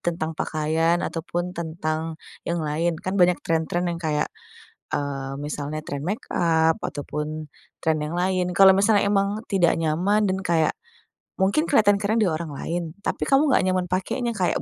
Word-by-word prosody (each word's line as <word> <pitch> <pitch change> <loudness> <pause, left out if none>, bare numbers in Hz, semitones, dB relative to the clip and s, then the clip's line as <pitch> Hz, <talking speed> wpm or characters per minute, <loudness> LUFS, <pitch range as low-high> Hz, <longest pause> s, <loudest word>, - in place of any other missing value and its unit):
tentang 165 -2 -2
pakaian 160 +2 +1
ataupun 175 +2 -3
tentang 160 -1 -3 0.3
yang 170 -2 -1
lain. 160 +3 0
Kan 190 +1 -1
banyak 180 0 +5
trend-trend 165 +2 0
yang 170 - -6
kayak 155 -3 -1 0.6
eee, 135 -1 -2
misalnya 150 +1 -4
trend 145 -1 -5
makeup 165 -4 +1
ataupun 150 +1 -4 0.3
trend 155 -1 0
yang 155 - -4
lain. 180 -1 0
kalau 190 +1 +7
misalnya 200 0 +3
memang 200 +1 +1
tidak 180 -5 +3
nyaman 185 +7 +2
dan 185 - +1
kayak, 165 -3 +2 0.7
mungkin 200 - +3
keliatan 210 -9 +4
keren 215 +3 +1
di 190 - +3
orang 155 -1 -3
lain. 165 +2 -4
Tapi - - -2
kamu 280 +2 +4
enggak 255 - +4
nyaman 185 -1 +1
pakainya, 215 +7 -1
kayak 185 -5 0
170 Hz, 155 wpm, -24 LUFS, 155-190 Hz, 0.7 s, kalau